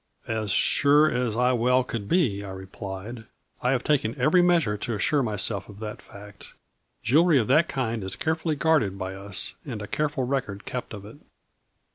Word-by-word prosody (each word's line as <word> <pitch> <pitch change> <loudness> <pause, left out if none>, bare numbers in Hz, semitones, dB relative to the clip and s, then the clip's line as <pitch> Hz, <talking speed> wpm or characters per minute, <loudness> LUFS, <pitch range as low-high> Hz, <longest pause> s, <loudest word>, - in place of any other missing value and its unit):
" - - -48
" - - -31
As 110 -2 -2
sure 145 +9 +4
as 120 -3 -1
I 125 +1 +3
well 125 +2 +2
could 115 -5 -5
be," 120 - +1
I 100 - -7
replied, 95 +4 -8 0.2
" - - -39
I 125 - +1
have 130 -2 +1
taken 135 -4 0
every 155 +8 +4
measure 170 -12 +2
to 115 +2 -3
assure 145 +8 +1
myself 105 -4 0
of 100 - -12
that 105 0 -7
fact, 100 0 -14 0.5
jewelry 155 +6 +4
of 115 - +2
that 155 +5 +4
kind 115 -5 -2
is 95 - -3
carefully 160 -2 -1
guarded 145 - +1
by 95 0 -4
us, 95 0 -4
and 125 -8 -6
a 105 - -5
careful 145 0 -1
record 125 -6 -3
kept 125 -3 -5
of 100 -1 -10
it." 110 +6 -12
120 Hz, 195 wpm, -25 LUFS, 100-145 Hz, 0.5 s, sure